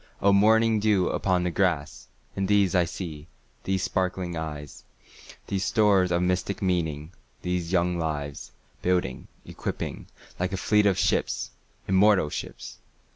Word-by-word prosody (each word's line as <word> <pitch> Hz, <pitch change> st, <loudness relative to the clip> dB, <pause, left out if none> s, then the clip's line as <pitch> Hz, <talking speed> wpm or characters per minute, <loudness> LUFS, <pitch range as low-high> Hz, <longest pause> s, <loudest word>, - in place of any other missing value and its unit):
O 100 Hz, 0 st, +4 dB
morning 110 Hz, +2 st, +4 dB
dew 105 Hz, -4 st, +2 dB
upon 90 Hz, -2 st, +1 dB
the 90 Hz, -, -1 dB
grass! 85 Hz, -5 st, -1 dB, 0.3 s
And 95 Hz, -1 st, -1 dB
these 100 Hz, -2 st, +3 dB
I 90 Hz, -2 st, +3 dB
see—these 85 Hz, +3 st, -6 dB
sparkling 90 Hz, -1 st, -1 dB
eyes, 75 Hz, -3 st, -6 dB, 0.6 s
These 95 Hz, -1 st, -2 dB
stores 100 Hz, -5 st, +3 dB
of 85 Hz, 0 st, +2 dB
mystic 90 Hz, +2 st, -1 dB
meaning—these 85 Hz, 0 st, -3 dB
young 90 Hz, -1 st, +1 dB
lives, 75 Hz, -3 st, -4 dB, 0.3 s
Building, 90 Hz, -8 st, -1 dB, 0.2 s
equipping, -, -, -5 dB, 0.3 s
like 90 Hz, +2 st, -1 dB
a -, -, -1 dB
fleet 105 Hz, +2 st, +3 dB
of 95 Hz, -, +2 dB
ships—immortal 95 Hz, -4 st, +1 dB
ships! -, -, -7 dB
90 Hz, 125 wpm, -26 LUFS, 85-100 Hz, 0.6 s, O